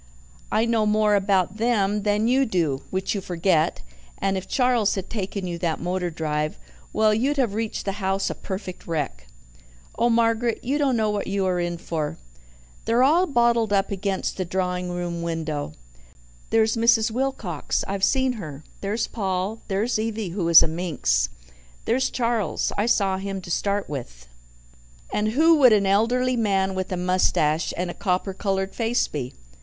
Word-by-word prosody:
I 220 - +2
know 225 -2 +1
more 210 0 +3
about 195 -1 +1
them 210 -3 +1
than 210 +2 +1
you 260 +3 +3
do, 165 - 0
which 190 0 -1
you 200 - -2
forget, 175 - 0 0.3
and 195 0 0
if 190 0 -4
Charles 250 -5 +2
had 195 -1 -5
taken 200 -2 -3
you 170 -1 -4
that 165 -3 -1
motor 180 +1 -2
drive 155 -2 -2 0.3
well, 215 -1 +3
you'd 270 +7 +1
have 245 -7 +1
reached 220 0 -3
the 195 - 0
house 195 +1 0
a - - -2
perfect 190 -2 -7
wreck. 145 - -3 0.7
Oh, 235 +1 +2
Margaret, 230 0 +1
you 275 +4 0
don't 270 -4 +2
know 215 -1 +1
what 205 -1 -2
you 195 0 0
are 180 -1 +1
in 175 0 -2
for. 160 -3 -3 0.7
They're 235 +2 +3
all 335 +7 +4
bottled 235 -5 +2
up 200 0 +1
against 195 0 -2
the 185 - -1
drawing 180 0 -2
room 175 -1 -3
window. 160 - -3 0.8
There's 220 0 +3
Mrs. 230 0 +3
Wilcox 230 - -2
I've 195 0 -3
seen 260 +4 +3
her. 150 -2 -8 0.2
There's 210 +3 -1
Paul. 195 +1 -3
There's 215 +4 0
Evie, 220 -3 -2
who 175 -1 -2
is 165 - +9
a - - +1
minx. 145 - 0 0.6
There's 260 +3 +1
Charles 230 -8 -1
I 205 +3 0
saw 195 -5 +2
him 195 0 -4
to 175 - -8
start 200 +3 0
with. 65 - -7 0.9
And 215 +1 0
who 320 +4 +5
would 255 -6 +7
an 200 -2 +3
elderly 245 +6 +2
man 195 -4 +1
with 185 0 -3
a 185 - -1
moustache 175 -3 +1
and 175 0 -2
a - - -8
copper 190 -1 -1
coloured 195 0 -2
face 235 +1 0
be?" 130 -4 -5
195 Hz, 170 wpm, -24 LUFS, 180-225 Hz, 0.9 s, is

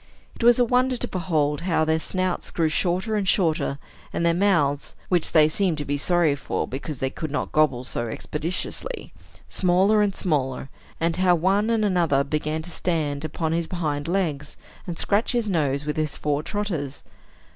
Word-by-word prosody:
It - - -6
was 240 0 +6
a 245 - +4
wonder 250 +1 +2
to - - -3
behold 155 -6 0
how 165 -3 +1
their 160 0 +2
snouts 185 +2 -2
grew 165 -2 +1
shorter 185 +6 0
and 200 -2 -1
shorter, 160 -7 +1 0.3
and 170 - -1
their 170 - +4
mouths 165 -7 +1
(which 175 -3 +2
they 155 -2 +6
seemed 175 0 +1
to 145 - -4
be 145 - -1
sorry 165 0 +2
for, 135 - -3
because 140 +2 -5
they 135 +1 -2
could 160 +1 -5
not 145 - -3
gobble 140 -5 +2
so 120 -2 -3
expeditiously) 170 - -4 0.3
smaller 190 +4 +3
and 205 -2 +1
smaller, 135 -6 -1 0.3
and 165 +1 0
how 180 -1 +4
one 195 +6 +2
and 225 -2 +2
another 170 -8 +2
began 155 +2 -2
to 175 - -9
stand 150 -6 -1
upon 160 +1 -2
his 165 0 0
hind 150 -5 -2
legs, 160 -6 -2 0.3
and 170 -2 -4
scratch 210 +5 +1
his 240 -3 0
nose 145 -4 0
with 150 0 -2
his 155 -2 -1
fore 145 -1 0
trotters. 165 -8 -4
165 Hz, 180 wpm, -24 LUFS, 150-185 Hz, 0.3 s, was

